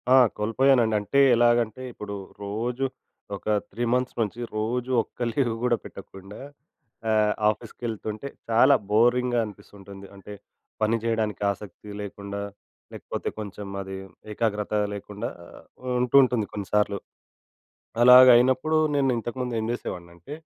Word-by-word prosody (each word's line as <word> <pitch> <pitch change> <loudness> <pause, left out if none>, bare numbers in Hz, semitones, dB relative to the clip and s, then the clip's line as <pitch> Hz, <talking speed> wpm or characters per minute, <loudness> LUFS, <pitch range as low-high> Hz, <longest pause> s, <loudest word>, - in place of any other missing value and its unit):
ఆ! - - +8 0.2
కోల్పోయానండి. 115 +1 +3
అంటే 140 +7 0 0.2
ఎలాగంటే, 120 0 +2
ఇప్పుడు 100 -1 -7 0.3
రోజు 120 +6 -2 0.5
ఒక - - -12 0.3
3 115 +5 -4
మంత్స్ 125 0 -1
నుంచి 110 +2 -3 0.2
రోజు 120 +4 -2
ఒక్క - - -17
లీవ్ 120 -2 0
కూడా 120 -1 +2
పెట్టకుండా 95 +1 -11 0.7
ఆహ్, 105 -1 +3 0.2
ఆఫీస్‌కెళ్తుంటే 110 +2 -5 0.2
చాలా 115 +1 +6 0.2
బోరింగ్‌గా 120 +2 +3
అనిపిస్తుంటుంది. 100 -1 -12
అంటే 100 +1 -11 0.5
పని 110 +2 +2
చేయడానికి 110 -3 -1
ఆసక్తి 105 +1 -10
లేకుండా 100 0 -6 0.5
లేకపోతే, - - -5
కొంచెం 100 -1 -7
అది 95 0 -7 0.4
ఏకాగ్రత 105 -1 -2 0.2
లేకుండా 105 +4 -6 0.2
ఆహ్, - - -14 0.4
ఉంటు 125 +2 0
ఉంటుంది 120 -5 0
కొన్నిసార్లు. 100 0 0 1.0
అలాగైనప్పుడు 130 +4 +7 0.2
నేను 135 -2 +2
ఇంతకుముందు 120 +1 -4
ఏం - - -3
చేసేవాడిని 85 -7 -6
అంటే 85 - -9
110 Hz, 115 wpm, -25 LUFS, 105-125 Hz, 1.0 s, ఆ